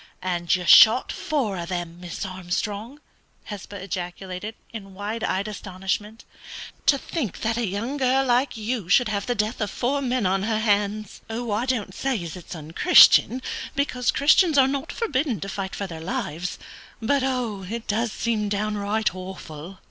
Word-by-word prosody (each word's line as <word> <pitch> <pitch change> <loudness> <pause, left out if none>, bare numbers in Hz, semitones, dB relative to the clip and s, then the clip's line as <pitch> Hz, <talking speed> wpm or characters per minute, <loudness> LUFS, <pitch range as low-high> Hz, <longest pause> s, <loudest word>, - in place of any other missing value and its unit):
"And 175 -2 +1
you 180 -1 -4
shot 225 +8 +8
four 275 - -2
of 170 +1 -5
them, 175 -2 -4
Miss 175 +2 -5
Armstrong!" 200 +7 -4 0.4
Hesba 205 -1 -8
ejaculated, 185 +2 -5 0.2
in 195 -4 -9
wide 210 +3 -4
eyed 195 +3 0
astonishment. 205 +2 -4 0.6
"To 280 - +6
think 270 - -4
that 225 +1 0
a 235 -2 -1
young 225 +9 -3
girl 265 0 +2
like 250 0 +1
you 220 -4 -3
should 230 +4 +4
have 200 -2 -2
the 245 - 0
death 215 +2 -1
of 210 - 0
four 275 +7 -1
men 250 -4 0
on 190 +1 +2
her 220 +2 0
hands! 210 -1 0
I 225 +1 -2
don't 225 -7 -1
say 260 -6 -2
as 165 0 -6
it's 180 0 -9
unchristian, 200 - +6 0.3
because 250 -3 0
Christians 310 +2 +4
are 265 -1 +6
not 275 +3 -3
forbidden 275 - -1
to - - -4
fight 195 -1 -4
for 200 - -3
their 165 -4 -8
lives, 170 0 -3 0.4
but 275 +5 +1
it 230 -4 -3
does 225 +2 0
seem 215 -3 -1
downright 210 0 -1
awful!" 185 -2 -8
210 Hz, 165 wpm, -24 LUFS, 190-245 Hz, 0.6 s, shot